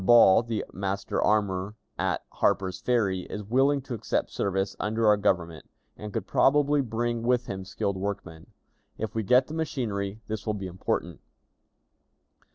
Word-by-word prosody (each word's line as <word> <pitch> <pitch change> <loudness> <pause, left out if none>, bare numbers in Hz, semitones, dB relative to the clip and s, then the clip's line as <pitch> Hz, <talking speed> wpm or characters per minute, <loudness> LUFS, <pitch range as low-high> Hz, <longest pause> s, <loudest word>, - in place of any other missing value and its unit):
Ball, 115 -2 +7
the 115 -2 -3
master 100 +1 -2
armorer 100 -1 +1 0.2
at - - -1
Harper's 95 -1 0
Ferry, 105 -7 +1
is 105 - -5
willing 135 +6 +2
to 125 - -6
accept 115 - -1
service 95 0 -1
under 110 +2 0
our 105 -1 +7
Government, 85 -5 -1 0.3
and 105 0 -7
could 110 -3 -3
probably 145 +6 +3
bring 120 -1 -2
with 125 +1 +1
him 95 -3 -5
skilled 100 +1 -2
workmen. 95 -4 -5 0.5
If 110 -1 -4
we 110 - 0
get 125 +5 +4
the 155 - -9
machinery, 110 -10 -2
this 110 0 -5
will 110 - 0
be 100 -2 -5
important. 90 0 -3
105 Hz, 155 wpm, -27 LUFS, 95-120 Hz, 0.5 s, Ball